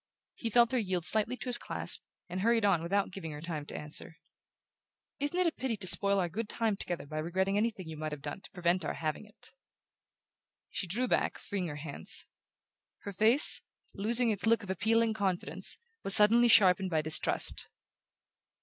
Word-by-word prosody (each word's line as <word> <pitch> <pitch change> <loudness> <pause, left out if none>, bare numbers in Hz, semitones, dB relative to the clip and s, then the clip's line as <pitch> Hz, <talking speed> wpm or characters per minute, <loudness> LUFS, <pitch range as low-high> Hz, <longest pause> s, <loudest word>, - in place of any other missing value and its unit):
He 230 - -5
felt 235 +1 +3
her 255 - 0
yield 185 -5 -3
slightly 220 +5 0
to - - -9
his 250 -1 +1
clasp, - - +1 0.2
and 180 +1 -5
hurried 230 0 +1
on 185 -5 +2
without 195 +4 -2
giving 165 -5 -8
her 150 - -9
time 155 -2 -7
to - - -7
answer. 150 +2 -5 1.0
"Isn't 290 +5 -3
it 365 - +2
a 335 - +1
pity 260 -6 -4
to 195 - -4
spoil 200 +2 +7
our 180 -2 0
good 210 +5 -6
time 225 -3 -1
together 175 -5 -5
by 155 +2 -6
regretting 190 +5 -2
anything 205 -4 -2
you 160 -1 -9
might 155 0 -5
have 150 -1 -8
done - - -7
to - - -10
prevent 180 0 -1
our - - -4
having 155 +5 -5
it?" 210 - -19 1.2
She 185 - -4
drew 240 +9 -1
back, - - -1
freeing 190 -3 -5
her 150 - -7
hands. 145 - -2 0.8
Her 200 - -8
face, 225 - +7 0.3
losing 230 +3 +2
its 210 +1 -4
look 230 -1 +2
of 190 - -6
appealing 225 +4 0
confidence, 195 -4 -2 0.3
was 195 - +3
suddenly 230 +3 +5
sharpened 190 -4 +4
by 160 -3 -1
distrust. 155 0 0
195 Hz, 185 wpm, -30 LUFS, 170-225 Hz, 1.2 s, spoil